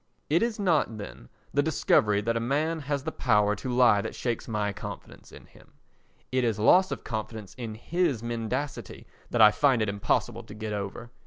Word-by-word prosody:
* - - -44
It 165 - +4
is 230 -2 0
not, 160 - +1
then, 100 - -9 0.2
the 145 - +3
discovery 105 -8 +2
that 115 +2 -1
a - - +1
man 150 +7 0
has 140 -1 -3
the - - -3
power 105 -4 +2
to 125 +4 -4
lie 120 -5 +5
that - - -6
shakes 120 -2 -3
my 105 -3 -1
confidence 100 -1 -9
in - - -13
him; - - -21 0.6
it 130 0 +1
is 115 -4 0
loss 185 - +5
of - - -5
confidence 110 -3 -5
in 115 -4 -6
his 140 -1 -1
mendacity 120 +4 -4 0.2
that 120 - +1
I 105 -1 +9
find 135 0 +3
it 110 - 0
impossible 100 0 -1
to 105 - -12
get 110 0 -5
over. 105 +4 -5
115 Hz, 195 wpm, -27 LUFS, 105-140 Hz, 0.6 s, I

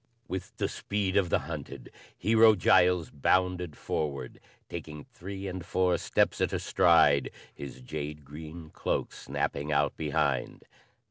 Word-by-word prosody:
With 95 0 -6
the - - 0
speed 100 -2 -2
of 95 -4 +3
the - - +3
hunted, 70 -3 -7 0.3
Hero 110 0 +6
Giles 90 -2 +4
bounded 90 +2 +1
forward, 70 -5 -3 0.3
taking 75 -3 -7
three 95 +2 -8
and 95 -2 -5
four 90 0 +1
steps - - +1
at - - +1
a - - +1
stride, 80 -5 +4 0.2
his 70 -2 -9
jade 75 +2 -6
green 80 +2 -9
cloak - - -2
snapping 75 +2 -3
out 75 0 +2
behind. 75 -3 -1
85 Hz, 135 wpm, -29 LUFS, 75-90 Hz, 0.3 s, Hero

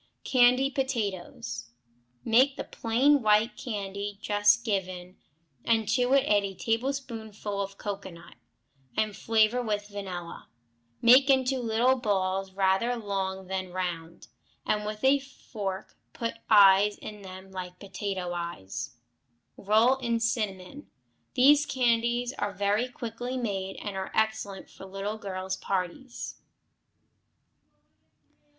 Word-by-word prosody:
Candy 255 +1 +4
Potatoes 200 - -3 0.6
Make 260 +5 +4
the - - -3
plain 260 +5 +2
white 215 +1 +3
candy 200 -3 -5
just 205 +2 +3
given, 185 -3 -3 0.5
and 225 -2 +2
to 250 +2 +2
it 275 - +5
add 205 -1 +3
a 195 -1 -4
tablespoonful 225 -4 -3
of 195 0 -5
cocoanut, 190 -5 -7 0.6
and 215 -2 0
flavor 225 +2 +2
with 210 -3 -2
vanilla. 185 -4 -7 0.5
Make 260 +4 +7
into 265 -1 +3
little 240 +2 +2
balls, 195 -4 -1
rather 195 +5 +2
long 195 -3 -3
then 185 -1 -4
round, 170 -2 -5 0.4
and 210 0 0
with 215 +1 -6
a 275 +1 +5
fork 210 -8 -7 0.2
put 230 -1 -3 0.2
eyes 205 0 +6
in 210 -1 -9
them 190 0 -10
like 180 -1 -7
potato 190 -2 -4
eyes. 125 - -5 0.6
Roll 220 +6 +3
in 235 -3 -1
cinnamon. 225 +2 -3 0.5
These 290 +3 +6
candies 240 -1 +1
are 205 0 -1
very 205 +5 +1
quickly 245 +1 -5
made, 195 -5 -3
and 205 -2 -6
are 190 0 -4
excellent 220 -3 -1
for 190 - -12
little 195 +3 -4
girls' 190 -2 -4
parties. 190 +7 -4
210 Hz, 120 wpm, -28 LUFS, 190-240 Hz, 0.6 s, Make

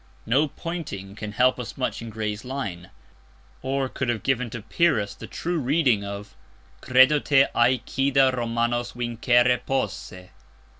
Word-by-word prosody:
No 135 +7 +3
pointing 140 - -6
can 105 0 -7
help 125 +3 +3
us 125 - -7
much 120 -4 -2
in 115 - -7
Gray's 110 0 -4
line, 100 -10 -5 0.7
or 135 0 -1
could 130 -1 -3
have 110 -4 -1
given 125 -2 0
to 115 -2 -7
Pyrrhus 110 -6 +1
the - - -10
true 175 0 -3
reading 130 -6 +2
of 100 0 -7 0.5
"Credo 130 +4 +5
te 135 -1 +4
Æacida 130 +2 +2
Romanos 120 0 -1
vincere 120 +1 +2
posse." 95 -8 -4
120 Hz, 140 wpm, -24 LUFS, 110-135 Hz, 0.7 s, Credo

